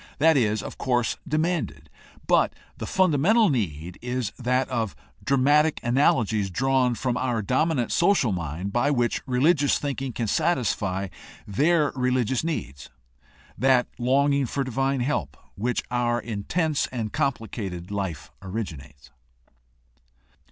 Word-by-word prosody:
That 160 +2 +5
is, 110 -5 +1
of - - -8
course, 120 -3 0
demanded; 155 - -1 0.4
but - - +3 0.2
the - - -4
fundamental 190 +5 +3
need 90 - -3
is 125 -1 -2
that 125 +1 +1
of 115 -5 -2 0.3
dramatic 145 +3 +3
analogies 115 -5 +2
drawn 130 +4 +1
from 125 0 -1
our 120 -4 -1
dominant 130 - +1
social 170 - +3
mind 90 +2 -4
by 130 +4 +2
which 120 -5 +1
religious 145 +3 +3
thinking 135 -2 -3
can 115 0 -3
satisfy 105 - 0 0.4
their 150 - +2
re 125 -1 +1
ligious 125 +1 0
needs, 70 - -4 0.7
that 130 0 +3
longing 140 +2 +2
for 140 +4 -1
divine 135 +1 -1
help, 140 +5 -2 0.2
which 120 +5 -2
our 120 -1 +1
intense 145 - -1
and 115 -4 -4
complicated 110 - -3
life 95 -7 -4
originates. 85 - -7
125 Hz, 125 wpm, -25 LUFS, 105-140 Hz, 0.7 s, That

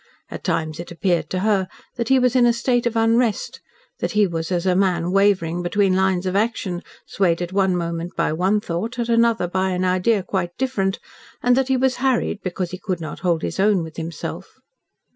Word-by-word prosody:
At - - -7
times 155 -1 -1
it 170 - -7
appeared 170 -2 0
to 185 - -2
her 200 -3 +2 0.3
that 235 -2 -3
he 265 - +5
was 250 -1 +2
in 245 -1 +5
a 235 - +4
state 240 +1 +1
of 235 - -3
unrest 225 0 +1 0.4
that - - -2
he 210 0 +4
was 165 -1 -3
as 175 0 0
a 185 -1 +3
man 180 -2 +1
wavering 190 -4 +2
between 185 +2 +1
lines 190 -1 +1
of 185 0 -1
action, 200 -4 -1 0.2
swayed 175 -4 +1
at 175 +1 -4
one 190 -2 +2
moment 170 0 -4
by - - 0
one 190 +6 +1
thought, 210 +8 -4
at 235 -1 -2
another 230 -4 +3
by 185 +2 0
an 185 0 -1
idea 185 +3 +2
quite 175 -2 -3
different, 215 -7 0 0.5
and 245 0 +4
that 265 0 +1
he 265 -1 +2
was 255 0 +1
harried 250 -5 0
because 180 -1 -3
he 185 - -6
could 185 -4 -3
not 155 -2 -6
hold 170 -3 0
his - - -3
own 200 -3 +3
with 160 -1 -10
himself. 165 -1 -6
190 Hz, 210 wpm, -21 LUFS, 175-230 Hz, 0.5 s, he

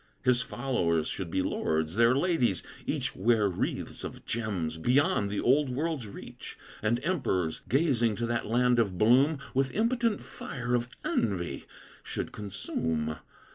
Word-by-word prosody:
His 125 -1 +4
followers 105 - 0
should 95 -4 -4
be 95 +3 0
lords; 80 +2 -1
their 115 +2 +5
ladies 140 - +1 0.2
each - - -1
Wear 110 +1 +3
wreaths 90 - -3
of - - -7
gems 95 -9 -2
beyond 130 - +2
the 100 - -2
old 140 +3 +3
world's 140 -2 -2
reach; 100 - -10 0.2
And 115 +3 +1
emperors, 115 - 0
gazing 125 -6 +2
to 115 - -2
that 120 0 -1
land 120 +2 +3
of 100 -6 +1
bloom, 130 - +5 0.2
With 135 0 +2
impotent 230 -1 +1
fire 125 -1 -5
of 120 0 +1 0.2
envy 85 -10 -1 0.4
should - - -4
consume. 80 -6 -3
120 Hz, 140 wpm, -29 LUFS, 95-135 Hz, 0.4 s, their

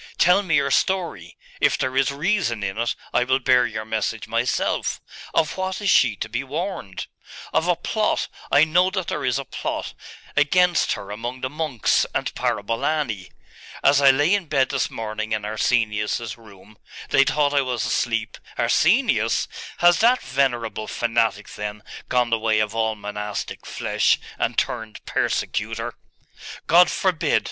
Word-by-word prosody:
Tell 180 +3 +5
me 175 -6 0
your 145 -2 +2
story. 170 - -1 0.2
If - - +3
there 130 0 -2
is 135 -1 +3
reason 145 - 0
in 95 -1 -2
it, 120 0 0 0.2
I - - +3
will 130 +1 +2
bear 125 -2 +3
your 110 -1 -5
message 110 -1 -2
myself. - - -1 0.4
Of 155 - +1
what 190 0 -2
is 205 -2 +1
she 120 -5 +4
to - - -5
be 120 +4 -3
warned?' 145 - -5 0.5
'Of - - +2
a - - +3
plot - - -1 0.2
I 145 - +6
know 175 +4 +3
that 190 -2 -3
there - - -3
is 125 -1 +1
a 140 - -4
plot - - -4 0.4
against 175 +5 +3
her 100 - -7
among 120 +4 -5
the 130 - -3
monks 150 -6 +1
and - - -1
Parabolani. 115 -1 -1 0.5
As 140 0 +5
I 140 - +7
lay 145 +7 +4
in 200 -5 0
bed 135 -3 +2
this 135 -3 -1
morning 110 0 -4
in 105 -1 -2
Arsenius's 110 0 0
room 105 -2 -17 0.3
they 140 - +5
thought 145 +1 +1
I 140 - +4
was 125 -3 -2
asleep - - -1
' - - -20
'Arsenius? - - +2 0.4
Has 175 0 +6
that 245 +3 +4
venerable 120 -5 -1
fanatic, 115 -3 0
then, 105 0 -6 0.3
gone 125 -2 +1
the 115 - +2
way 110 -1 +1
of 110 0 0
all 110 -1 0
monastic 105 0 -5
flesh, - - +1 0.2
and - - -1
turned 110 -1 -3
persecutor?' - - -2 0.7
'God 175 +2 +6
forbid! 185 -4 +1
125 Hz, 160 wpm, -23 LUFS, 110-150 Hz, 0.7 s, I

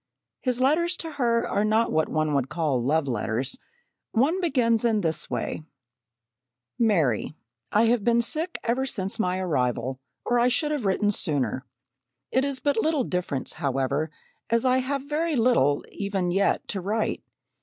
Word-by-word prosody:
His 250 -2 0
letters 330 +7 +2
to 325 - -5
her 235 -5 +1
are 205 - 0
not 220 +2 +2
what 155 0 +1
one 155 -1 0
would 135 -2 0
call 155 -6 0
"love 150 +3 +1
letters." 120 - -2 0.5
One 305 +11 +2
begins 245 - +2
in 225 -3 +2
this 160 -3 -1
way: - - -3 1.2
"MARY: 160 - +2 0.4
I 215 - +4
have 230 -2 +2
been 235 +1 +3
sick 325 +8 0
ever 255 +3 0
since 195 -2 -2
my 180 -3 +1
arrival, 130 -7 -1 0.3
or 240 0 +2
I 240 - +4
should 295 +5 +1
have 290 -7 -2
written 205 +2 +2
sooner. 145 -7 -1 0.6
It 260 - +2
is 280 -2 -1
but 280 -5 +1
little 310 -2 +1
difference, 180 - -2
however, 140 +3 0 0.4
as 230 +2 +2
I 255 0 +4
have 270 +1 -2
very 310 +2 0
little 225 - +3
even 195 -3 -2
yet 195 +2 +1
to 195 - -2
write. 215 +4 -1
215 Hz, 160 wpm, -26 LUFS, 155-255 Hz, 1.2 s, I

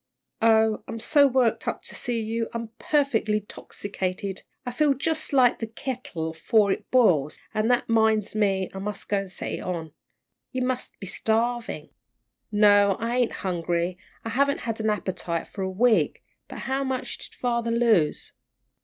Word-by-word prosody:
"Oh, 220 -1 +4
I'm 230 - -5
so 285 +5 +5
worked 255 -3 +1
up - - -2
to - - -6
see 240 -2 -2
you 225 +1 -2
I'm 230 -1 -4
perfectly 240 -8 +1
'tossicated. 195 -2 -5 0.2
I 245 - -2
feel 280 +3 +2
jus' 315 +3 -1
like 255 -3 +4
the 225 - -3
teakettle 225 -9 -4
afore 200 +5 +2
it - - -3
boils, 170 - +3 0.2
an' 215 0 +1
that 245 0 +2
'minds 220 -2 +2
me 195 -3 +1
I 190 - -6
mus' 205 +1 -4
go 195 -1 -1
set 185 - -5
it - - -3
on. 165 -3 -4 0.6
You 255 -1 -1
mus' 255 0 -2
be - - -7
starvin'." 225 +4 -1 0.6
"No, 205 -2 +5
I 235 +2 -1
ain't 245 -2 +2
hungry; 175 0 -1 0.3
I - - -2
haven't 280 +5 +1
had 225 -1 -3
an 220 0 +1
appetite 185 -5 -2
for 200 - -7
a 190 - -1
week. 225 +5 +2 0.3
How 270 +1 -2
much 260 -1 -3
did - - -10
father 235 -2 -1
lose?" 230 -9 +2
220 Hz, 160 wpm, -25 LUFS, 195-245 Hz, 0.6 s, so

